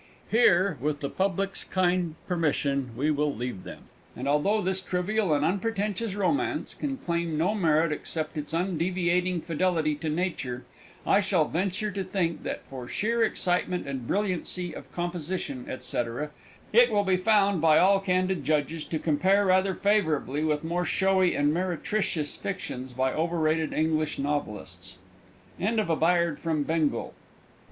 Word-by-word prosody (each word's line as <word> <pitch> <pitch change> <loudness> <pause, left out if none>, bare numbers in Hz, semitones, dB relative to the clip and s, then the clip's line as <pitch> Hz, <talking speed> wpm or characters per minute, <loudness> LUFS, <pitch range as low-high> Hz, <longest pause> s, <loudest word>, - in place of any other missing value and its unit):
Here, 185 - +4
with 145 +1 -1
the 140 - -3
Public's 195 +1 0
kind 180 -3 0
permission, 145 -6 0
we 150 +3 +1
will 150 0 +1
leave 120 -5 -5
them, - - -10 0.3
and 130 +3 -4
although 150 +10 +2
this 190 -1 -1
trivial 190 +2 0
and 145 0 +2
unpretentious 200 +2 -1
romance 205 +8 0
can 275 -2 -3
claim 170 -6 -2
no 175 +7 +2
merit 165 -5 +2
except 155 +1 -4
its 150 -1 -4
undeviating 180 0 0
fidelity 165 -2 0
to 155 +1 -3
nature, 150 -7 -2 0.4
I 195 - +4
still 190 -5 +2
venture 190 +5 -1
to 195 -1 -3
think 180 -3 -1
that, - - -4
for 130 -2 -8
sheer 230 - 0
excitement 180 -4 0
and 130 -4 -4
brilliancy 185 -3 -1
of - - -10
composition, 175 -6 -4
&c, - - -1 0.7
it 240 +1 +6
will 205 -1 +3
be 190 -2 +2
found, 200 -2 +3
by 155 -1 +5
all 195 +2 +5
candid 185 -1 0
judges, 155 +1 0
to 160 - -2
compare 185 +7 +2
rather 190 0 +3
favourably 160 -9 +1
with 150 -1 0
more 170 +2 -1
showy 190 +1 +2
and 145 +1 +2
meretricious 180 -2 -1
fictions 130 -9 -5
by 130 +1 0
overrated 160 -1 0
English 155 -1 0
novelists. 100 -10 -4 0.6
END 220 +4 +1
OF 210 -6 0
A - - +3
BAYARD 170 -1 +2
FROM 160 -3 0
BENGAL. 160 -1 0
175 Hz, 150 wpm, -27 LUFS, 150-190 Hz, 0.7 s, it